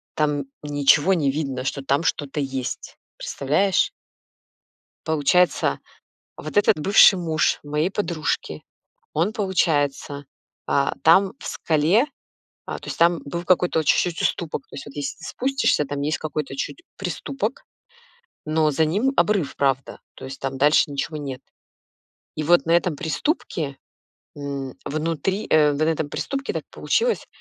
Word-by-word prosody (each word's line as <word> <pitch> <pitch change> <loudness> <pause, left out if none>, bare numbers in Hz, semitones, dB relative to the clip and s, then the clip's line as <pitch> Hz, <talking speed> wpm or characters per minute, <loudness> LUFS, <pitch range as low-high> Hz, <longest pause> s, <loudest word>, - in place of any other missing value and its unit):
там 145 -2 0 0.2
ничего 145 +4 +4
не 145 -5 +1
видно, 135 -4 -3
что 140 +1 -2
там 140 +4 +1
что-то 145 -2 -1
есть, 135 -2 -4 0.2
представляешь? 155 +8 +1 1.2
Получается, 160 +3 +2 0.6
вот - - -8
этот 205 -6 +4
бывший 195 +4 +7
муж 160 -3 +1
моей 150 +4 0
подружки, 170 -7 -2 0.5
он, 170 +7 +1
получается, 145 -8 0 0.4
а, 140 0 +1
там 190 +4 +5
в - - -11
скале, 165 - +2 0.6
а, - - -4
то - - -11
есть - - -5
там 170 0 +4
был 170 +5 -5
какой-то 180 -2 +2
о - - -3
чуть-чуть 170 +3 +2
уступок, 155 -5 -1
то - - -15
есть - - -7
вот 145 - -11
если 145 +1 -4
ты 160 - -12
спустишься, 265 - +1
там 145 0 -4
есть 150 +2 -1
какой-то 150 -3 -4
чуть-чуть 235 - -5
приступок, 270 - -4 0.8
но 155 0 +2
за 155 +3 +2
ним 205 +12 +1
обрыв, 200 - +1
правда, 135 -1 0 0.2
то - - -9
есть 135 +1 -8
там 135 0 -3
дальше 145 +3 +4
ничего 145 +2 -3
нет. 135 -3 -6 0.9
И 155 - -3
вот 175 +2 +4
на 165 - +2
этом 170 -2 +2
приступке, 160 - -2 0.6
м, 140 -2 -5
внутри, 165 +6 -2
э, 150 -2 +5
на 145 +2 0
этом 160 -2 0
приступке 275 - -3
так - - -3
получилось, 475 0 0
155 Hz, 145 wpm, -23 LUFS, 145-180 Hz, 1.2 s, бывший